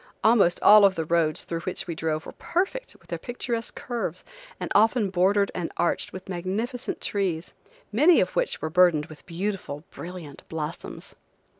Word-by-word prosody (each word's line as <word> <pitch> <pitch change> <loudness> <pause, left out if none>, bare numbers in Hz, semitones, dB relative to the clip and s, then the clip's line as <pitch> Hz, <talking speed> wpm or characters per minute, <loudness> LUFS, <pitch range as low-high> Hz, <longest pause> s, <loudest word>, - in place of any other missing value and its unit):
Almost 215 -6 +4
all 210 0 +9
of 195 -1 +5
the 160 - -2
roads 160 -1 +1
through 165 - -4
which 180 +2 -4
we 170 - -4
drove 155 -1 -2
were - - -7
perfect 390 +9 -2
with - - -25
their - - -3
picturesque 240 -1 -4
curves, 225 -9 -4 0.4
and - - -4
often 215 -1 +4
bordered 195 +2 +3
and 175 -2 -3
arched 175 - 0
with 185 - -9
magnificent 195 +7 -3
trees, 180 -5 -2 0.4
many 300 +11 +6
of - - 0
which - - -1
were 155 - -2
burdened 175 -3 +4
with 155 -2 -13
beautiful 180 -4 -4
brilliant 170 -5 -9
blossoms. 160 0 -6
185 Hz, 165 wpm, -26 LUFS, 165-220 Hz, 0.4 s, all